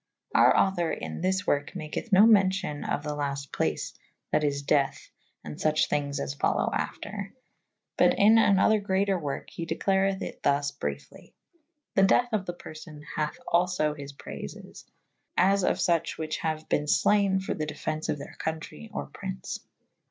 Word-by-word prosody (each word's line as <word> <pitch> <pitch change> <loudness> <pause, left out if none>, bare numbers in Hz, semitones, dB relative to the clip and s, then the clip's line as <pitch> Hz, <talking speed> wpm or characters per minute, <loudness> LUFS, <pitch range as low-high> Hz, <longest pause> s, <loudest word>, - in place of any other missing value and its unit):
Our - - +6
author 175 -4 +2
in - - -5
this 190 +2 0
worke 145 0 0
maketh 155 +9 -5
no 195 +2 +8
mencyon 190 -7 +3
of 145 - -1
the 150 0 -3
laste 140 -2 -4
place - - -1 0.4
that 150 - +2
is 140 -1 0
deathe 140 -1 +2 0.5
and 75 - -7
fuche 155 0 +2
thynges 145 -1 -1
as 70 0 -3
folowe - - +1
after 205 -1 -4 0.3
/ - - -56
but - - +5
in 220 +3 +6
an 200 -3 +5
other 215 +3 +4
greater 195 -1 +1
worke 145 -4 -5
he 170 - -5
declareth 190 +3 +1
it - - -7
\hus 140 0 +2
briefly. 140 - -7 0.6
The 195 - +3
dethe 240 +5 +4
of 200 -3 0
the 175 - -2
per 175 - -10
fone 155 -1 -11
hathe 150 -1 -1 0.2
alfo 170 -4 +2
his 140 -1 -8
prayfes 70 - -9 0.3
/ - - -43
as 200 -1 +2
of - - +2
fuche 170 -1 +1
whiche 155 -1 -3
haue 155 -1 -2
ben 150 - +1
flayne 195 +6 +3
for 190 - -3
the 155 -1 -3
defence 155 +1 -4
of - - 0
theyr 140 - -9
contrey 160 +7 -5
or 210 - -4
prynce. 190 -1 -6
165 Hz, 175 wpm, -28 LUFS, 145-195 Hz, 0.6 s, no